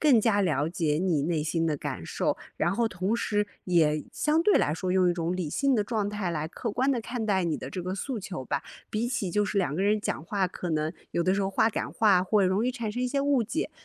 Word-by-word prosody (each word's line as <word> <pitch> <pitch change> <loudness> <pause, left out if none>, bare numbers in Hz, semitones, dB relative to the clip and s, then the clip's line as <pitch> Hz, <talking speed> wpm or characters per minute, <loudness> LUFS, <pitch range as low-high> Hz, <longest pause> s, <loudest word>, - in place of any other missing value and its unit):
更 280 -7 +5
加 210 -2 +3
了 155 -5 +1
解 160 -4 0
你 175 -6 +1
内 160 +1 0
心 165 +2 0
的 155 -2 0
感 - - -5
受。 - - 0 0.2
然 175 - +1
后 230 +3 +1
同 185 +2 -1
时， 210 -3 0 0.2
也 155 -4 +3
相 310 +2 +1
对 420 - +4
来 145 - +2
说 180 +3 -2
用 185 -1 +4
一 - - +2
种 170 +1 -2
理 170 -5 -3
性 275 - +2
的 210 - +1
状 210 -2 -1
态 205 -4 -2
来 155 -1 -2
客 230 +6 -4
观 260 +6 +1
地 255 - +1
看 230 0 -4
待 190 -3 +2
你 165 -3 -1
的 - - -6
这 185 - -5
个 185 +2 -3
诉 235 +4 -3
求 185 -8 -6
吧， 135 - -2 0.3
比 220 +3 -1
起 215 -8 -2
就 210 +4 +2
是 200 0 -1
两 175 -6 0
个 185 - 0
人 210 +1 +2
讲 165 - -3
话， 190 -1 0
可 180 -1 -5
能 155 0 0 0.2
有 170 - 0
的 185 +2 +2
时 200 - 0
候 195 - -1
话 220 +3 +3
赶 220 - -3
话 210 -6 +4
会 195 +1 +3
容 195 +5 +1
易 - - +2
产 235 -4 -3
生 245 +4 -3
一 250 - +1
些 275 +2 0
误 275 -4 +2
解， 305 +8 -2
195 Hz, 290 characters per minute, -28 LUFS, 170-225 Hz, 0.3 s, 更